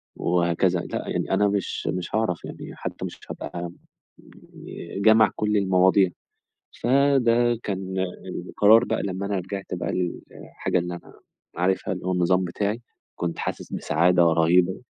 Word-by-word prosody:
وهكذا، 85 Hz, +1 st, +1 dB
لأ، -, -, -5 dB
يعني -, -, -2 dB
أنا 105 Hz, -, +3 dB
مش 100 Hz, -1 st, -2 dB
مش 90 Hz, +3 st, -2 dB
هاعرَف 110 Hz, -6 st, -1 dB
يعني -, -, -9 dB
حتى -, -, -5 dB
مش -, -, -8 dB
هابقى 85 Hz, +3 st, -5 dB, 0.9 s
ي -, -, -8 dB
جامع 110 Hz, -1 st, +6 dB
كُلّ 105 Hz, 0 st, +1 dB
المواضيع، 95 Hz, -1 st, +4 dB, 0.7 s
فده 120 Hz, -3 st, +3 dB
كان 95 Hz, -1 st, -4 dB, 0.5 s
القرار 110 Hz, +3 st, +5 dB
بقى -, -, -1 dB
لمّا 95 Hz, 0 st, -3 dB
أنا 100 Hz, 0 st, -1 dB
رِجعت 95 Hz, +2 st, -5 dB
بقى 90 Hz, -, -3 dB
للحاجة 90 Hz, 0 st, -3 dB
اللي 90 Hz, 0 st, -3 dB
أنا 85 Hz, -, -12 dB, 0.4 s
عارفها 95 Hz, +2 st, 0 dB
اللي 90 Hz, 0 st, -8 dB
هو 95 Hz, -, +1 dB
النظام 90 Hz, +1 st, +2 dB
بتاعي، 100 Hz, +6 st, -2 dB, 0.3 s
كنت 85 Hz, -1 st, -3 dB
حاسس -, -, -5 dB
بسعادة 85 Hz, +3 st, +2 dB
رهيبة. 85 Hz, +5 st, +3 dB
95 Hz, 140 wpm, -24 LUFS, 90-105 Hz, 0.9 s, جامع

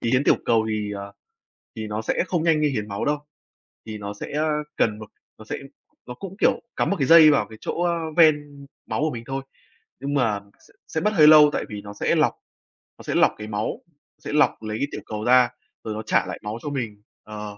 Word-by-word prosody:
Thì 115 Hz, -, -1 dB
hiến 130 Hz, +2 st, +2 dB
tiểu -, -, +5 dB
cầu 115 Hz, -2 st, +2 dB
thì, 105 Hz, -1 st, -2 dB
à, 100 Hz, -, -6 dB, 0.7 s
thì 110 Hz, -1 st, -4 dB
nó 105 Hz, +1 st, -4 dB
sẽ 115 Hz, -, 0 dB
không 175 Hz, -3 st, 0 dB
nhanh 160 Hz, -2 st, +3 dB
như 150 Hz, -, +3 dB
hiến 105 Hz, -6 st, -3 dB
máu 100 Hz, +1 st, -3 dB
đâu. 150 Hz, 0 st, +1 dB, 0.7 s
Thì 110 Hz, -1 st, -6 dB
nó 100 Hz, 0 st, -6 dB
sẽ, 105 Hz, -, -8 dB
a, 155 Hz, +1 st, 0 dB, 0.3 s
cần 110 Hz, -1 st, +1 dB
một 110 Hz, -, -10 dB, 0.3 s
nó 110 Hz, -, -13 dB
sẽ -, -, -4 dB, 0.5 s
nó 125 Hz, -, -6 dB
cũng, 195 Hz, +9 st, -9 dB
kiểu, -, -, +2 dB
cắm -, -, 0 dB
một 200 Hz, -, +1 dB
cái 135 Hz, -, +1 dB
dây 160 Hz, -2 st, +9 dB
vào 140 Hz, -, +2 dB
cái 110 Hz, -, -11 dB
chỗ, 175 Hz, -, -3 dB
a, 170 Hz, -1 st, +2 dB, 0.2 s
ven 145 Hz, -3 st, +3 dB, 0.2 s
máu -, -, -2 dB
của 155 Hz, 0 st, +1 dB
mình 115 Hz, -1 st, -6 dB
thôi, 135 Hz, 0 st, -4 dB, 0.6 s
nhưng 140 Hz, +1 st, -3 dB
mà 115 Hz, -7 st, +1 dB, 0.3 s
sẽ -, -, -24 dB
sẽ 160 Hz, -, -3 dB
mất 210 Hz, -, +2 dB
hơi 155 Hz, -6 st, +6 dB
lâu. 150 Hz, -1 st, +9 dB
Tại -, -, -2 dB
vì 105 Hz, -1 st, -6 dB
nó 100 Hz, 0 st, -9 dB
sẽ -, -, 0 dB
lọc, -, -, +3 dB, 0.7 s
nó -, -, -11 dB
sẽ -, -, -3 dB
lọc -, -, +4 dB
cái 105 Hz, 0 st, -7 dB
máu, 105 Hz, 0 st, -3 dB, 0.4 s
sẽ -, -, -4 dB
lọc 150 Hz, -, +2 dB
lấy 110 Hz, 0 st, -4 dB
tiểu -, -, -6 dB
cầu 105 Hz, 0 st, -5 dB
ra 125 Hz, 0 st, +5 dB, 0.4 s
rồi 110 Hz, -, -3 dB
nó 110 Hz, -, -4 dB
trả -, -, +2 dB
lại -, -, -6 dB
máu 105 Hz, +2 st, -4 dB
cho 150 Hz, -, -4 dB
mình. 115 Hz, -7 st, -4 dB, 0.2 s
Ờ, 105 Hz, -1 st, -8 dB
120 Hz, 240 wpm, -23 LUFS, 105-150 Hz, 0.7 s, dây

